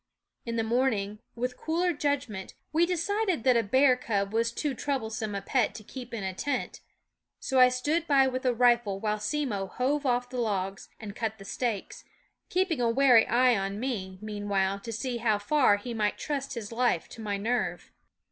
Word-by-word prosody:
In 230 - -2
the 225 - +1
morning, 220 -4 0 0.2
with 250 +1 -3
cooler 345 +2 0
judgment, 280 -10 -2 0.2
we 335 +2 +4
decided 370 - 0
that 255 -2 +4
a 235 - +4
bear 260 +4 +4
cub 205 -5 -2
was 230 +1 +1
too 285 +4 -2
troublesome 220 -6 -3
a 200 - -4
pet 245 +1 +1
to 215 - -8
keep 250 +2 -9
in 230 -4 -4
a 190 0 -2
tent; 285 +9 -3 0.6
so 265 -1 +1
I 255 0 +8
stood 300 +7 -1
by 275 -2 +5
with 255 0 -2
a 255 - +3
rifle 240 -4 +3
while 210 0 -1
Simmo 210 -4 -2
hove 275 +8 -1
off 245 0 0
the 250 - -3
logs 195 -3 -2
and 210 -2 -8
cut 220 -2 -3
the 195 - -12
stakes, 240 - -3 0.5
keeping 360 -7 +1
a 235 - +3
wary 245 -2 +5
eye 245 +1 +4
on 195 0 -2
me, 200 -7 -3
meanwhile, 200 -2 -1
to 230 +3 -7
see 240 +2 -3
how 225 -3 +2
far 205 0 +3
he 235 +4 -6
might 210 -2 0
trust 275 -3 -3
his 225 -2 -6
life 235 -7 +1
to 225 - -10
my 205 -2 -2
nerve. 235 +5 -2
235 Hz, 190 wpm, -28 LUFS, 210-265 Hz, 0.6 s, I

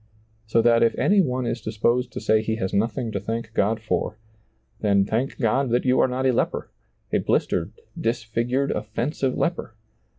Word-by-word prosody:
So 115 +1 +3
that 115 0 +5
if 115 - +3
any 200 0 +4
one 130 -6 -1
is 120 0 -2
disposed 120 +4 0
to - - -4
say 110 0 +2
he 110 0 -1
has 95 -4 -3
nothing 115 +3 0
to 100 - -2
thank 110 +2 -4
God 110 +3 +1
for, 105 0 -2 0.6
then 100 -2 +3
thank 115 +6 -1
God 130 +2 +1
that 120 +2 +1
you 130 0 +3
are - - +5
not 130 +1 -2
a 130 - +4
leper - - -1 0.2
— - - -33
a - - +3
blistered, 85 +5 0 0.2
dis 115 0 -1
figured, 120 +5 -1
offensive 120 +5 -2
leper 170 -9 -2
115 Hz, 190 wpm, -24 LUFS, 110-125 Hz, 0.6 s, that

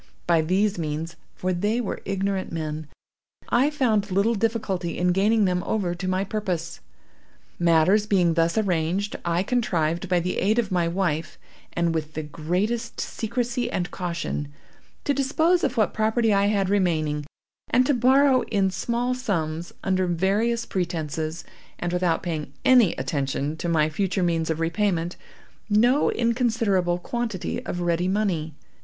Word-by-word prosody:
By 165 -2 +3
these 190 +4 +1
means—for 165 +3 -4
they 205 +6 0
were 235 - -3
ignorant 195 0 -2
men—I 155 - -3
found 225 -9 +1
little 200 +5 +2
difficulty 205 -6 -1
in 180 0 +2
gaining 205 +3 +3
them 180 -1 +1
over 190 -5 -1
to 180 +2 -5
my 185 +1 +1
purpose. 185 -5 -3 0.8
"Matters 175 +5 +4
being 180 -5 +3
thus 165 +3 +1
arranged, 190 0 0
I 170 +1 +1
contrived, 175 -7 0
by 180 -1 +3
the 180 +2 -2
aid 210 +5 +2
of 225 -5 0
my 175 -2 +2
wife 170 -3 -1 0.4
and 170 -1 +1
with 155 -1 -3
the 155 - -3
greatest 185 - -2
secrecy 240 +1 -2
and 180 -6 -2
caution, 170 -5 -3 0.5
to 285 - +1
dispose 315 +6 +2
of 250 - 0
what 215 -3 +2
property 220 0 +2
I 200 0 +3
had 200 -2 +1
remaining, 155 -7 0 0.4
and 255 - +4
to 285 - +3
borrow, 260 +2 +4
in 195 -2 +1
small 240 +6 -1
sums, 170 -9 -2
under 185 -1 +1
various 205 +7 +1
pretences, 160 -3 -3 0.3
and 175 0 -3
without 180 -2 +1
paying 160 -4 -4
any 245 -8 +6
attention 140 +2 -2
to 170 - -3
my 155 -2 +3
future 185 +3 -1
means 165 -2 0
of 160 0 -1
repayment, 170 0 0 0.5
no 240 +7 +4
inconsiderable 225 -7 +1
quantity 225 0 -3
of 175 - -3
ready 175 +1 +1
money. 185 -6 -1
185 Hz, 145 wpm, -24 LUFS, 170-220 Hz, 0.8 s, any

